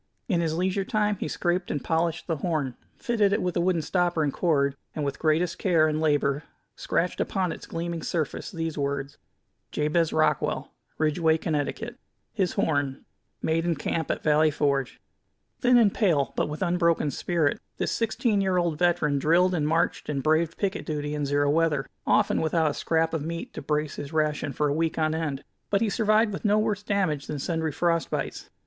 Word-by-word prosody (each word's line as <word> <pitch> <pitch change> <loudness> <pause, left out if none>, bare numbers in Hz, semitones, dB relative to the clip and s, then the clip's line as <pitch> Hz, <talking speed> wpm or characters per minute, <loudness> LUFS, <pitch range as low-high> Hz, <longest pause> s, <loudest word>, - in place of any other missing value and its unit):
In 180 -7 +1
his 160 -1 0
leisure 185 +3 0
time 210 0 +1
he - - -3
scraped 175 0 -1
and 145 - -2
polished 165 0 0
the 165 -3 -1
horn, 145 -5 -1 0.2
fitted 215 -4 +1
it - - +2
with 180 -1 -1
a 175 - +2
wooden 175 -2 +1
stopper 175 -1 +1
and 145 -2 0
cord, 140 -5 +1 0.2
and 150 - -2
with 140 - -3
greatest 165 +2 +1
care 165 -5 +3
and 155 0 -1
labor 145 -1 +1 0.3
scratched 175 +2 -1
upon 185 -3 0
its - - -8
gleaming 170 0 -4
surface 155 -2 -2
these 165 -3 -4
words: 140 0 -3 0.5
Jabez 155 +2 +1
Rockwell, 155 0 +1 0.3
Ridgeway, 160 +1 +2
Conn 150 -3 -1 0.7
His 190 -5 0
Horn 145 -3 -1 0.4
Made 160 +1 +1
in 170 -1 +1
Camp 160 +3 -2
at - - -2
Valley 155 +1 +4
Forge 140 -3 0 0.6
Thin 245 -1 +5
and 220 -5 +5
pale, 165 - +1
but - - 0
with 150 +4 -3
unbroken 170 -4 +2
spirit, 160 -1 0 0.2
this - - -1
sixteen 220 -2 +1
year 190 -1 +1
old 170 -4 0
veteran 170 -5 +2
drilled 175 +5 +3
and 155 -4 0
marched 165 +2 0
and 140 -3 -2
braved 160 +1 +2
picket 200 -1 -1
duty 150 -1 -3
in 145 -1 -1
zero 145 +1 +2
weather, 155 -3 +2 0.2
often 205 0 +3
without 160 -1 +2
a - - -5
scrap 165 +1 0
of 160 - -1
meat 170 +2 -5
to - - -6
brace 150 +1 -1
his 145 0 -6
ration 150 -2 0
for 150 +3 0
a 140 - +1
week 160 +1 0
on 155 -1 +1
end; 150 -4 -3 0.3
but 200 - +2
he 220 -1 +1
survived 215 -1 +3
with - - -5
no 210 -1 +3
worse 215 -1 0
damage 185 -9 -1
than 150 - -3
sundry 160 +2 -1
frost 165 +2 0
bites. - - -4
160 Hz, 190 wpm, -26 LUFS, 150-180 Hz, 0.7 s, Thin